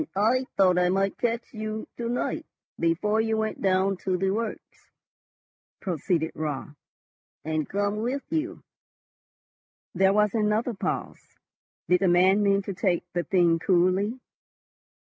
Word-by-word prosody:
"And 310 - -5
I 235 +6 +2
thought 185 -2 +4
I 180 0 +3
might 195 +1 0
catch 235 -1 -2
you 215 0 -5
to 235 -1 -3
night 245 - -2 0.3
before 190 +6 +1
you 220 0 0
went 220 0 -2
down 190 0 +2
to 185 0 -1
the 190 +1 0
works," 220 +2 -5 0.9
proceeded 165 -2 -1
Raut, 150 -3 -4 0.8
"and 155 -1 -2
come 200 +1 -1
with 250 +6 -2
you." 320 +1 -2 1.3
There 190 +1 +4
was 210 0 +2
another 220 +2 +1
pause. 195 - -3 0.7
Did 180 0 +4
the 195 - +3
man 185 +3 +4
mean 200 -1 +2
to 195 - -4
take 180 -1 0
the 175 - 0
thing 170 -3 +3
coolly? 185 +7 +2
195 Hz, 140 wpm, -26 LUFS, 180-220 Hz, 1.3 s, thought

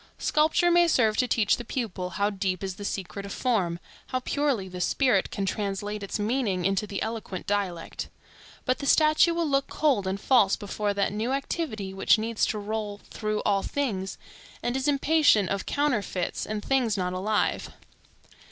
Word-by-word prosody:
Sculpture 315 +3 +2
may 345 0 +5
serve 225 -9 +3
to 250 - +2
teach 220 -4 +2
the 240 - -6
pupil 215 -7 -3
how 205 +1 +2
deep 190 -2 -2
is 190 -1 -4
the 205 - -7
secret 200 0 -4
of 200 - -7
form, 195 -10 0 0.3
how 255 - -1
purely 260 -6 0
the 180 -1 -7
spirit 235 -1 +2
can 195 - -3
translate 205 +1 -3
its 200 - -3
meanings 210 -4 0
into 195 +2 +1
that 200 -2 -3
eloquent 220 -5 -5
dialect. 195 -5 -2 0.6
But 255 - +1
the 280 - -4
statue 310 +3 +5
will 335 -1 0
look 275 -1 +1
cold 270 -11 +1
and 190 +1 -2
false 220 -5 +4
before 205 0 -3
that 200 0 0
new 225 +5 -1
activity 270 - -3
which 195 +3 +4
needs 225 0 0
to 215 - -2
roll 210 0 -4
through 215 -1 -2
all 200 -1 +2
things, 200 -10 -2 0.5
and 240 +1 -1
is 265 +1 -1
impatient 290 -7 +4
of 200 -1 -2
counterfeits 240 -11 -1
and 210 -1 -4
things 245 -6 +1
not 180 -1 -1
alive. 205 +3 0
210 Hz, 175 wpm, -27 LUFS, 195-260 Hz, 0.6 s, may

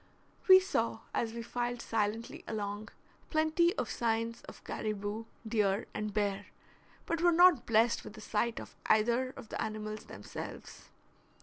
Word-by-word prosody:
We 375 -1 +11
saw, 380 +1 -1
as 225 - 0
we 235 0 -5
filed 240 +1 -2
silently 225 0 -2
along, 210 0 -4 0.4
plenty 315 +2 +3
of 250 - -1
signs 230 0 -1
of - - -12
caribou, 215 +1 -3 0.2
deer, 210 -1 +1
and 210 0 -3
bear, 205 -1 -1 0.6
but 335 -1 -1
were 350 0 +5
not 350 -5 +6
blessed 230 +1 +3
with 215 - -10
a - - -9
sight 225 +2 -1
of - - -10
either 235 +4 +3
of 245 -5 -10
the - - -3
animals 215 0 -4
themselves. - - -9
225 Hz, 145 wpm, -32 LUFS, 215-245 Hz, 0.6 s, We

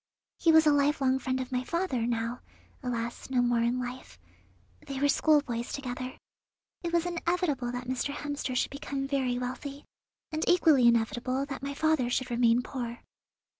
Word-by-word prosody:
He 330 - +5
was 320 0 +6
a 300 - +6
lifelong 280 -2 +2
friend 260 0 -1
of 260 0 -5
my 250 0 0
father, 270 -7 -1
now, 235 +1 -2 0.4
alas, 240 -2 -4
no 260 -2 +1
more 240 -1 +3
in 235 +2 +1
life. 250 +1 -6 0.7
They 275 -1 -4
were 285 - +3
schoolboys 280 -5 +2
together. 255 -1 -5 0.6
It 340 - -3
was 340 0 +2
inevitable 340 -7 -1
that 245 0 -5
Mr. 260 +2 -1
Hemster 290 -2 -4
should - - 0
become 280 -1 -4
very 265 -3 0
wealthy, 265 +3 -5 0.5
and 310 0 -1
equally 315 -8 +5
inevitable 240 +3 +1
that 270 -2 -6
my 280 0 -4
father 315 -5 +2
should 255 0 -1
remain 235 0 +3
poor. 240 -3 -5
260 Hz, 165 wpm, -29 LUFS, 245-290 Hz, 0.7 s, was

